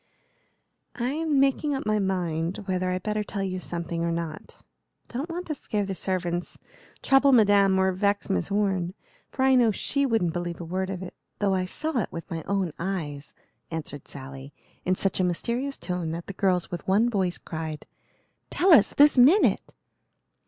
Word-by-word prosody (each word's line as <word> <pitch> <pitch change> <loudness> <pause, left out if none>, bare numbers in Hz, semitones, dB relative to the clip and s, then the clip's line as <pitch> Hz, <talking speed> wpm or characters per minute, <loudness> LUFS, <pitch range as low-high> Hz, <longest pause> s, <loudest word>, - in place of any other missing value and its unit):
"I'm 290 +4 0
making 275 +2 +2
up 270 - -4
my 215 0 +1
mind 180 -1 -1
whether 185 -1 -1
I'd 185 0 -2
better 210 0 -1
tell 200 -1 -4
you 185 -1 -3
something 170 -1 -4
or 170 - 0
not. 165 -2 -6 0.5
Don't 270 +8 -4
want 350 +2 -4
to 310 - -3
scare 210 -7 -2
the 195 - -3
servants, 175 -1 -2 0.5
trouble 270 +1 +5
Madame, 205 -5 +5
or 190 0 +3
vex 200 +2 0
Miss 195 - -1
Orne; 195 -3 0 0.3
for 260 - -2
I 265 - +5
know 245 -3 +5
she 280 +6 0
wouldn't 220 -9 +1
believe 175 -1 -4
a 170 - -6
word 185 +3 -2
of 190 -1 -4
it, 180 - -8 0.2
though 200 -2 +1
I 185 -1 0
saw 305 +8 -2
it - - -3
with 165 -1 -8
my 165 -1 -3
own 195 -4 0
eyes," 155 -6 -4 0.3
answered 150 -4 -6
Sally, 135 0 -9 0.3
in 185 - +2
such 195 0 +1
a - - +3
mysterious 235 +10 -1
tone 180 -3 -3
that 170 +1 -5
the 195 - -7
girls 185 -3 0
with 175 - -6
one 205 +5 +4
voice 190 -6 0
cried, 160 -2 -6 0.6
"Tell 365 0 +4
us, 235 -10 +5
this 290 -2 +6
minute!" 315 +12 +4
190 Hz, 180 wpm, -26 LUFS, 175-235 Hz, 0.6 s, this